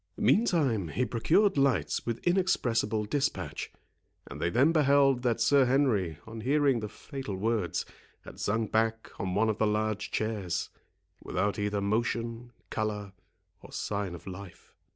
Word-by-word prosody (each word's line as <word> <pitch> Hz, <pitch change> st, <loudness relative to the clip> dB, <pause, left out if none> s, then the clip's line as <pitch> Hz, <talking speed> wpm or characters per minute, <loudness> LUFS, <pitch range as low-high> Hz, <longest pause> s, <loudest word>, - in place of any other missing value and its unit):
Meantime 140 Hz, -, +2 dB
he 125 Hz, +10 st, -1 dB
procured 160 Hz, -, +2 dB
lights 135 Hz, -3 st, +1 dB
with 115 Hz, -1 st, -3 dB
inexpressible 120 Hz, -, +1 dB
dispatch, 140 Hz, +6 st, -2 dB, 0.5 s
and -, -, -9 dB
they 85 Hz, -, +1 dB
then 130 Hz, -, +4 dB
beheld 140 Hz, -4 st, +4 dB
that 120 Hz, -3 st, +1 dB
Sir 140 Hz, -2 st, +5 dB
Henry, 120 Hz, -, +1 dB
on 110 Hz, 0 st, -8 dB
hearing 140 Hz, 0 st, +2 dB
the 105 Hz, -1 st, -5 dB
fatal 135 Hz, -4 st, -6 dB
words, 105 Hz, -2 st, -1 dB, 0.4 s
had -, -, -11 dB
sunk 110 Hz, +1 st, -1 dB
back 115 Hz, 0 st, 0 dB
on 95 Hz, -1 st, -2 dB
one 110 Hz, +2 st, +3 dB
of 110 Hz, -1 st, -1 dB
the 110 Hz, -, +3 dB
large 105 Hz, 0 st, -1 dB
chairs, 100 Hz, -6 st, -2 dB, 0.5 s
without 100 Hz, +2 st, -1 dB
either 105 Hz, 0 st, -1 dB
motion, 115 Hz, +3 st, -1 dB, 0.2 s
colour, 105 Hz, -2 st, -3 dB, 0.5 s
or -, -, -13 dB
sign 100 Hz, -4 st, -3 dB
of 85 Hz, -, -12 dB
life. 95 Hz, -1 st, -10 dB
115 Hz, 145 wpm, -29 LUFS, 105-135 Hz, 0.5 s, Sir